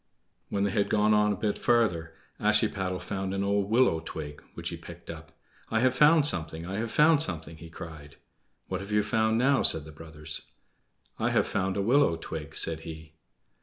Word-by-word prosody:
When 100 Hz, -, -1 dB
they 100 Hz, -, 0 dB
had 100 Hz, +1 st, 0 dB
gone 105 Hz, 0 st, +3 dB
on 105 Hz, 0 st, +3 dB
a -, -, -1 dB
bit 105 Hz, +1 st, -2 dB
farther 90 Hz, -10 st, +1 dB, 0.2 s
Ashiepattle 90 Hz, -1 st, +1 dB
found 95 Hz, +1 st, -3 dB
an 100 Hz, -, -1 dB
old 100 Hz, 0 st, 0 dB
willow 115 Hz, -8 st, +3 dB
twig, 75 Hz, -2 st, -7 dB
which -, -, -4 dB
he -, -, -5 dB
picked -, -, -10 dB
up. -, -, -11 dB, 0.4 s
"I 110 Hz, -, +1 dB
have 130 Hz, 0 st, +3 dB
found 150 Hz, +3 st, +5 dB
something! 80 Hz, -, -1 dB
I 95 Hz, +2 st, -4 dB
have 115 Hz, +1 st, -2 dB
found 150 Hz, +5 st, +4 dB
something!" 80 Hz, -, -2 dB
he 85 Hz, +1 st, -11 dB
cried. 80 Hz, -4 st, -10 dB, 0.5 s
"What 95 Hz, 0 st, -4 dB
have 100 Hz, +2 st, -8 dB
you 105 Hz, 0 st, +2 dB
found 110 Hz, +1 st, +1 dB
now?" 135 Hz, +3 st, +3 dB
said 80 Hz, -2 st, +5 dB
the 80 Hz, -, -11 dB
brothers. 75 Hz, 0 st, -6 dB, 0.8 s
"I -, -, +1 dB
have -, -, +2 dB
found 95 Hz, +1 st, -2 dB
a 100 Hz, -, 0 dB
willow 125 Hz, -4 st, +3 dB
twig," 80 Hz, -2 st, -7 dB
said 80 Hz, -1 st, +1 dB
he. 80 Hz, -1 st, -10 dB
95 Hz, 195 wpm, -28 LUFS, 80-110 Hz, 0.8 s, found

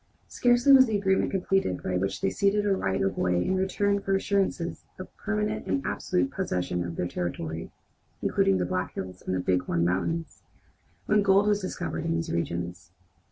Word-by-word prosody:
Scarcely 245 Hz, +3 st, +3 dB
was 260 Hz, -1 st, +8 dB
the 215 Hz, -2 st, +1 dB
agreement 190 Hz, -1 st, +1 dB
completed 190 Hz, -, 0 dB
by 90 Hz, -, -2 dB
which 95 Hz, +2 st, -1 dB
they 195 Hz, -, +1 dB
ceded 205 Hz, 0 st, +1 dB
a 200 Hz, -1 st, +3 dB
right 95 Hz, -, -1 dB
of 95 Hz, -, -1 dB
way 90 Hz, 0 st, +1 dB
in 190 Hz, -, +1 dB
return 200 Hz, +2 st, +1 dB
for 195 Hz, 0 st, 0 dB
assurances 195 Hz, -3 st, -1 dB
of 185 Hz, -, -10 dB
permanent 210 Hz, 0 st, -2 dB
and 275 Hz, -, -1 dB
absolute 190 Hz, +9 st, -1 dB
possession 90 Hz, -, -2 dB
of 85 Hz, -1 st, -5 dB
other 90 Hz, -, -2 dB
territory, 80 Hz, -2 st, -4 dB, 0.5 s
including 95 Hz, -, +2 dB
the 90 Hz, -, 0 dB
Black 90 Hz, 0 st, -3 dB
Hills 90 Hz, -1 st, -6 dB
and 95 Hz, -1 st, -1 dB
Bighorn 90 Hz, -2 st, +1 dB
Mountains, 155 Hz, -, -2 dB, 0.6 s
when 210 Hz, 0 st, +3 dB
gold 195 Hz, 0 st, +4 dB
was 210 Hz, -1 st, +2 dB
discovered 80 Hz, -, -4 dB
in 80 Hz, -, 0 dB
these 85 Hz, 0 st, -2 dB
regions. 85 Hz, +1 st, -3 dB
170 Hz, 175 wpm, -27 LUFS, -, 0.6 s, was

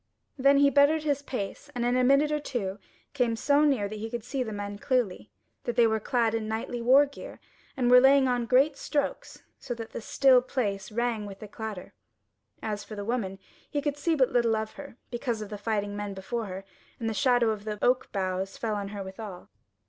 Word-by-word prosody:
Then 275 Hz, +1 st, +4 dB
he 280 Hz, 0 st, +5 dB
bettered 290 Hz, +3 st, +4 dB
his 285 Hz, -2 st, 0 dB
pace, 255 Hz, +1 st, -5 dB
and 240 Hz, -1 st, -1 dB
in 245 Hz, +1 st, +2 dB
a 255 Hz, -, +3 dB
minute 275 Hz, +4 st, +4 dB
or 300 Hz, -, +1 dB
two 210 Hz, -9 st, -4 dB, 0.3 s
came 245 Hz, -5 st, +1 dB
so 285 Hz, +6 st, +3 dB
near 265 Hz, -9 st, +2 dB
that 215 Hz, +1 st, -7 dB
he 225 Hz, +1 st, -4 dB
could 235 Hz, -1 st, -5 dB
see 260 Hz, +2 st, -3 dB
the 230 Hz, -3 st, -3 dB
men 205 Hz, -1 st, -5 dB
clearly, 210 Hz, -, -1 dB, 0.4 s
that 240 Hz, -, -2 dB
they 240 Hz, -1 st, +5 dB
were 220 Hz, -1 st, +2 dB
clad 230 Hz, 0 st, +1 dB
in 225 Hz, -1 st, -2 dB
knightly 225 Hz, +2 st, -3 dB
war 265 Hz, +5 st, +6 dB
gear, 285 Hz, -, -10 dB, 0.4 s
and 245 Hz, -2 st, +2 dB
were 250 Hz, -, +10 dB
laying 270 Hz, +1 st, +5 dB
on 245 Hz, -2 st, 0 dB
great 270 Hz, +4 st, +4 dB
strokes 285 Hz, +1 st, -3 dB, 0.2 s
so 245 Hz, -, -5 dB
that 225 Hz, -1 st, -8 dB
the -, -, -6 dB
still 260 Hz, +2 st, +4 dB
place 205 Hz, -6 st, -3 dB
rang 230 Hz, -2 st, -1 dB
with 195 Hz, -1 st, -9 dB
the 215 Hz, -, -9 dB
clatter. 210 Hz, -2 st, -7 dB, 0.7 s
As 210 Hz, -1 st, -3 dB
for 215 Hz, -, -9 dB
the 205 Hz, -1 st, -5 dB
woman, 210 Hz, -5 st, -2 dB, 0.3 s
he 290 Hz, -, -1 dB
could 285 Hz, 0 st, -1 dB
see 320 Hz, +3 st, 0 dB
but 260 Hz, -4 st, +3 dB
little 235 Hz, -2 st, +3 dB
of 220 Hz, 0 st, -3 dB
her, 280 Hz, -4 st, -11 dB
because 240 Hz, -2 st, -2 dB
of 210 Hz, -2 st, -6 dB
the 210 Hz, -, -5 dB
fighting 205 Hz, -1 st, -2 dB
men 205 Hz, -1 st, -4 dB
before 225 Hz, +4 st, -4 dB
her; 190 Hz, +1 st, -7 dB, 0.3 s
and 230 Hz, -, -2 dB
the 225 Hz, -, 0 dB
shadow 245 Hz, -2 st, +3 dB
of 210 Hz, -1 st, -5 dB
the 210 Hz, -1 st, -4 dB
oak 255 Hz, +1 st, +2 dB
boughs 190 Hz, -1 st, -2 dB
fell 225 Hz, -2 st, -2 dB
on 200 Hz, -1 st, -3 dB
her 200 Hz, -1 st, -6 dB
withal. 190 Hz, -1 st, -9 dB
235 Hz, 220 wpm, -28 LUFS, 210-265 Hz, 0.7 s, were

